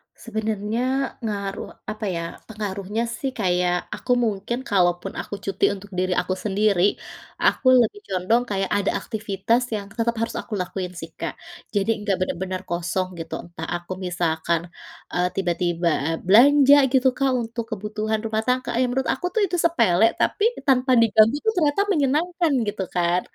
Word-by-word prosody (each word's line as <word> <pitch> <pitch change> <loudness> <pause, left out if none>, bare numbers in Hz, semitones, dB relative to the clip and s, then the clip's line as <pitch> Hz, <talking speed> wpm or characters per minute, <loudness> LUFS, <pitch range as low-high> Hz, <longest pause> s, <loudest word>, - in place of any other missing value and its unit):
Sebenarnya 220 -1 -3 0.4
ngaruh, 200 -2 -4 0.2
apa 215 0 -4
ya, 170 - -2 0.3
pengaruhnya 205 0 -3
sih 260 +3 -3
kayak 180 -2 +1
aku 250 - -4
mungkin 215 +3 -1
kalau 180 -3 +4
pun - - -6
aku 205 - -5
cuti 195 -1 +1
untuk 200 +1 -10
diri 185 0 0
aku 185 +1 -2
sendiri, 200 -1 +1 0.6
aku 255 - +2
lebih 245 - +1
condong 195 +6 +1
kayak 195 -1 -1
ada 200 - +1
aktivitas 220 +1 -1
yang 200 -1 -5
tetap 230 +1 +1
harus 230 - -2
aku 220 - -10
lakuin 180 0 -4
sih, 165 - -7
Kak. - - -3 0.4
Jadi 200 +2 0
enggak 200 -2 +1
benar-benar 185 0 -2
kosong 175 +2 -1
gitu 165 - -7
entah 170 -1 -8
aku 175 +1 -7
misalkan, 170 -1 0 0.5
eee, 180 0 +2
tiba-tiba 175 -2 0 0.2
a - - +1 0.2
belanja 280 +6 +7 0.2
gitu 260 0 +4
Kak 275 -1 +2
untuk 230 0 -4
kebutuhan 215 +1 -2
rumah 220 0 -1
tangga, 255 +1 0
ya - - +4
menurut 265 +1 -1
aku 355 - -6
tuh 440 - +1
itu 355 - -2
sepele 225 - +4
tapi 415 - +1 0.2
tanpa 260 -1 +3
diganggu 220 +3 +5
tuh 440 - +4
ternyata 305 +3 +2
menyenangkan 320 +3 +1 0.2
gitu 200 -2 -2
kan. 175 +1 +2
210 Hz, 160 wpm, -23 LUFS, 185-235 Hz, 0.6 s, belanja